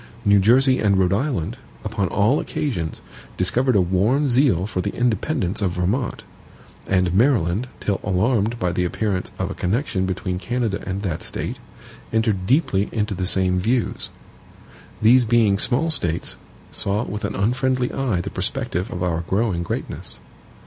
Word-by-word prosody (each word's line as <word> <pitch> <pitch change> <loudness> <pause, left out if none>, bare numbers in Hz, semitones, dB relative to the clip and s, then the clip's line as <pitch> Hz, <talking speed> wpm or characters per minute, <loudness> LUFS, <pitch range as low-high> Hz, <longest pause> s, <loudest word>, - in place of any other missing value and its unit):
New 100 0 +5
Jersey 130 +6 +4
and 100 -2 +3
Rhode 95 0 +3
Island, 120 - -1 0.3
upon 105 -2 -1
all 105 - +2
occasions, 90 - -3 0.4
discovered 125 +7 +2
a 100 - +5
warm 105 +11 +2
zeal 120 - +3
for 95 -3 -2
the - - -2
independence 110 - 0
of 95 -4 0
Vermont; 100 +9 -1 0.6
and 90 -2 +2
Maryland, 110 - +2
till 100 -2 -1
alarmed 105 +3 +1
by 90 -5 0
the 90 0 0
appearance 95 +1 -2
of - - -2
a - - -3
connection 95 -1 -1
between 90 -1 -3
Canada 120 -2 -2
and 95 +1 -3
that 85 -5 -2
State, - - -4 0.5
entered 110 -4 0
deeply 120 - +2
into 105 -1 -1
the 95 -1 -2
same 95 -1 +2
views. 115 +5 -1 0.9
These 125 +3 +6
being 110 -4 +3
small 145 +9 +1
States, 85 - 0 0.4
saw 100 +3 +2
with 105 -2 -5
an - - -2
unfriendly 125 +4 0
eye 120 -10 0
the - - -6
perspective 90 +3 -2
of 90 - -3
our 85 -2 0
growing 100 -3 0
greatness. 85 - -5
100 Hz, 155 wpm, -22 LUFS, 90-120 Hz, 0.9 s, These